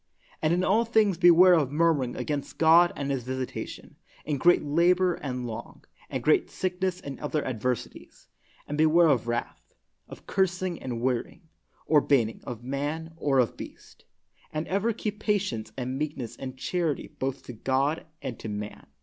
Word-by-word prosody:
And 155 - +2
in 180 +2 +2
all 215 +5 +3
things 215 -6 +2
beware 180 +1 +7
of 150 -6 +2
murmuring 150 -5 +1
against 145 -2 -4
God 165 +2 +6
and 140 0 -3
His 135 -2 -1
visitation, 130 +1 -6 0.3
in 145 -3 -1
great 175 +5 +5
labor 175 +4 +3
and 125 -5 -4
long, 115 0 -8 0.2
and - - -3
great - - +3
sickness 185 0 -2
and 140 -6 -8
other 150 0 -2
adversities, 125 0 -4 0.4
and 150 +1 -4
be 155 - +6
ware 165 +1 +5
of 120 -5 +1
wrath, 120 0 -4 0.3
of - - -12
cursing 185 -2 -1
and 120 -3 -4
warying, 130 +6 -2 0.4
or 150 -2 +4
ban 135 -6 +3
ning, 110 - -8
of 120 -1 -7
man 145 +5 -3
or 145 -4 0
of 125 -3 +2
beast. - - -12 0.5
And 155 +1 -3
ever 200 +5 +1
keep 210 -1 -4
patience 200 - -1
and 130 +1 -3
meekness 145 -6 -4
and 130 -1 -7
charity 165 +1 -1
both 135 0 -3
to 125 - -8
God 135 +7 0 0.2
and 130 -5 -5
to 110 - -6
man. 105 0 -6
150 Hz, 170 wpm, -27 LUFS, 130-175 Hz, 0.5 s, beware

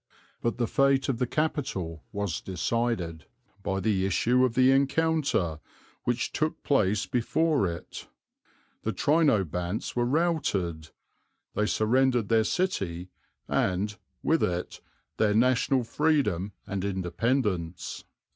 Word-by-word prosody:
But 115 - -1
the 120 - +1
fate 135 +2 +2
of 125 -3 -1
the 125 - +1
capital 120 - -2
was 100 -5 -2
decided 95 - -2 0.3
by 95 0 -1
the 95 -1 +1
issue 125 +6 +2
of 125 -3 +1
the 130 0 +5
encounter 140 - +1 0.5
which 120 0 0
took 155 0 -2
place 105 -7 +2
before 140 - +1
it. 85 -1 -7 0.7
The 110 - -2
Trinobantes 100 - +1
were 120 0 +1
routed. 115 - 0 0.6
They 105 - +1
surrendered 120 0 +2
their 110 -1 +4
city 95 - -1 0.4
and, 100 +3 0 0.3
with 160 - +2
it, 90 0 -2 0.4
their 105 -1 +2
national 125 +2 +3
freedom 115 - +1
and 100 -2 -3
independence. 95 -1 -1
110 Hz, 115 wpm, -28 LUFS, 95-135 Hz, 0.7 s, the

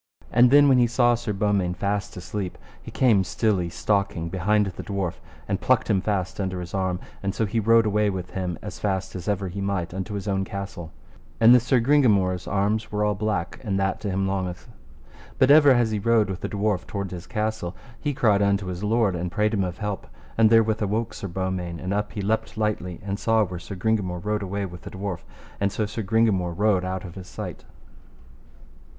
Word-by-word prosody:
And 120 +1 +6
then 145 +2 +7
when 130 -2 +5
he 120 - +4
saw 120 +1 +3
Sir 120 -2 -2
Beaumains 100 -3 0
fast 100 0 -2
asleep, 90 +1 -5 0.2
he - - -10
came 110 -7 +3
stilly 95 -3 0
stalking 100 -3 -1
behind 105 +4 +2
the 95 -2 -6
dwarf, 100 -4 -3 0.3
and - - -1
plucked - - +2
him 95 - +2
fast 100 -2 -2
under 95 -1 -2
his 90 -1 -7
arm, 95 -2 -1 0.2
and 100 +1 -2
so 110 - +1
he 110 +3 -1
rode 115 +1 +4
away 105 0 +2
with 95 -2 -5
him 90 -3 -3
as - - -7
fast 95 -2 -2
as 90 -2 -6
ever 100 -2 0
he 95 +3 -5
might 95 -4 -2
unto 95 +2 -4
his 100 +1 -5
own 95 -1 0
castle. 95 -4 -6 0.5
And 115 +1 +8
this 125 -1 +5
Sir 130 0 +3
Gringamore's 105 -9 +3
arms 105 +2 0
were 105 0 0
all 105 - +2
black, 100 -4 -2
and 100 -4 -1
that 95 0 0
to 105 - -2
him 95 0 0
longeth. 95 -2 -3 0.7
But 130 +1 +5
ever 145 -1 +8
as 120 -4 +4
he 105 - -1
rode 110 -2 +2
with 95 - -6
the - - -3
dwarf 100 -3 -1
toward 100 -2 -4
his 90 -1 -7
castle, 105 -4 -2 0.2
he 145 -2 -2
cried 110 -7 +3
unto 100 -1 +2
his 90 +3 -7
lord 105 -3 +2
and 85 0 -3
prayed 105 +4 +1
him 100 -3 +1
of 90 -2 -4
help. 105 -2 -4 0.3
And 110 -1 +5
therewith 110 -1 +4
awoke 105 +2 -1
Sir 100 - -6
Beaumains, 90 -2 -3
and 95 +2 -3
up 105 +1 -2
he 100 - -4
leapt 110 +1 -1
lightly, 105 -5 -2
and 100 +1 -3
saw 115 -1 +3
where 90 -3 -5
Sir 100 +3 -8
Gringamore 95 -2 -1
rode 105 0 0
his 95 - -5
way 100 +1 -2
with 90 -2 -9
the - - -8
dwarf, 95 -2 -4 0.4
and 100 0 +1
so 110 - -1
Sir 110 +2 -4
Gringamore 95 -5 +1
rode 105 -3 +2
out 95 0 -3
of 85 - -8
his 95 -1 -9
sight. - - -7
100 Hz, 215 wpm, -24 LUFS, 95-110 Hz, 0.7 s, And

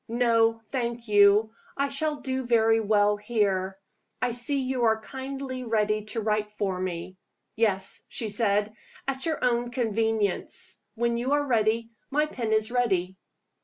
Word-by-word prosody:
"No, 230 -1 +2
thank 235 -2 -3
you. 205 +1 +5 0.2
I 280 0 +1
shall 295 +1 -1
do 260 -1 -2
very 225 -1 +4
well 210 -1 +3
here. 200 -3 0 0.4
I 250 - 0
see 245 +4 -1
you 255 -2 0
are 220 -1 +3
kindly 265 +1 -6
ready 215 -2 0
to 225 +1 -3
write 215 0 0
for 200 -3 -2
me." 185 0 -4 0.4
"Yes," 200 -4 +1
she 225 -4 -3
said, 210 0 +2 0.3
"at 270 +3 -2
your 315 -5 0
own 240 0 +1
convenience. 225 -4 -1 0.2
When 235 0 0
you 260 +4 0
are 290 0 +2
ready, 230 -2 +1 0.2
my 300 +2 +2
pen 240 -7 -4
is 220 +1 +2
ready." 190 -7 +1
225 Hz, 150 wpm, -27 LUFS, 210-250 Hz, 0.4 s, you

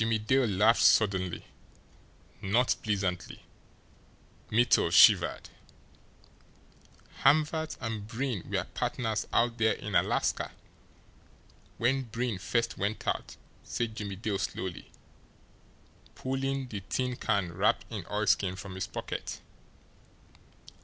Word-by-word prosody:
Jimmie 110 0 +2
Dale 125 +4 +2
laughed 110 +3 +3
suddenly 95 +1 +3 1.0
not 115 +6 +2
pleasantly. 100 -5 -2 1.1
Mittel 120 +2 +3
shivered. - - +5 1.7
"Hamvert 155 +2 +2
and 110 -4 -4
Breen 120 -3 -3
were - - 0
partners 110 -3 -2
out 120 0 +1
there 110 0 +3
in - - -7
Alaska - - +1 1.2
when 130 +3 +2
Breen 115 -3 -3
first 115 +4 -1
went 100 +2 -2
out," - - -2 0.3
said 115 -2 -3
Jimmie 100 -3 -5
Dale 105 0 -2
slowly, 95 -2 -5 1.2
pulling 135 0 -2
the 105 -3 -5
tin 125 -1 -1
can 100 -8 -1
wrapped - - +1
in - - -4
oilskin 95 -2 +1
from 95 0 -8
his 95 - -4
pocket. - - -5
110 Hz, 105 wpm, -29 LUFS, 100-125 Hz, 1.7 s, shivered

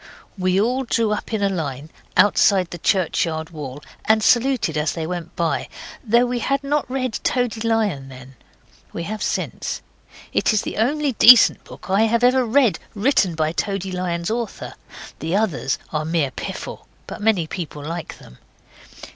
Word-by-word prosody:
We 185 -1 +1
all 250 +5 +1
drew 230 -3 0
up 210 - -3
in 215 -2 -1
a - - +4
line 150 -5 -4 0.3
outside 195 -3 +4
the 175 - -7
churchyard 160 -3 0
wall, 145 -3 -8 0.2
and 220 0 +3
saluted 245 - +2
as 150 0 0
they 165 -2 -4
went 175 0 -6
by, 170 -1 -1 0.3
though 235 +1 +3
we 245 0 -2
had 275 +3 -1
not 290 -1 -1
read 255 -3 -2
Toady 245 -3 0
Lion 215 -12 0
then. 130 0 -12 0.6
We 170 - -4
have 215 +4 -5
since. - - -3 0.5
It - - +2
is 215 - +1
the - - -5
only 285 +5 +1
decent 240 -1 +7
book - - -13
I 195 +2 +3
have 235 +2 +1
ever 255 +1 +4
read 245 -1 +2 0.2
written 200 - +2
by 155 -1 0
Toady 195 +1 -3
Lion's 175 0 -2
author. 235 -1 -4 0.5
The 165 +3 -2
others 200 -10 0 0.2
are 155 0 0
mere 155 -4 0
piffle. - - -7 0.2
But - - -8
many 210 -6 +2
people 155 -3 -6
like 165 0 -6
them. 60 - -16
200 Hz, 165 wpm, -21 LUFS, 165-235 Hz, 0.6 s, decent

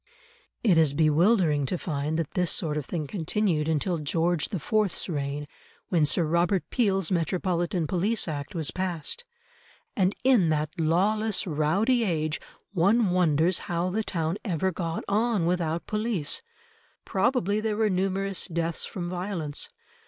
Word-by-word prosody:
It 185 -8 +5
is 150 -3 +3
bewildering 155 - +3
to 180 - -1
find 150 -2 -2
that 165 -3 -2
this 180 -2 0
sort 155 -4 0
of 150 -3 -3
thing 160 -4 -3
continued 165 -1 0
until 160 +2 0
George 165 +2 0
the 195 - -3
Fourth's 215 +4 0
reign, 145 -3 -3 0.4
when 165 -4 +3
Sir 160 +4 +2
Robert 170 +2 +1
Peel's 195 -7 +1
Metropolitan 175 0 0
Police 195 +7 0
Act 150 +4 -5
was 160 -4 0
passed. 185 - -3 0.7
And 190 -1 +2
in 245 -10 +4
that 155 0 0
lawless 200 +7 +2
rowdy 190 - +2
age, 155 -6 -1 0.3
one 200 +3 +3
wonders 175 -1 +3
how 175 +1 0
the 215 +4 0
town 165 -1 -2
ever 190 -2 0
got 165 -2 -3
on 215 -2 +1
without 170 -2 -1
police; 210 -8 0 0.6
probably 205 -1 +1
there 215 -1 -1
were 220 -1 +3
numerous 195 0 -1
deaths 170 -2 -2
from 175 -4 -5
violence. 175 -4 -3
175 Hz, 145 wpm, -27 LUFS, 160-195 Hz, 0.7 s, It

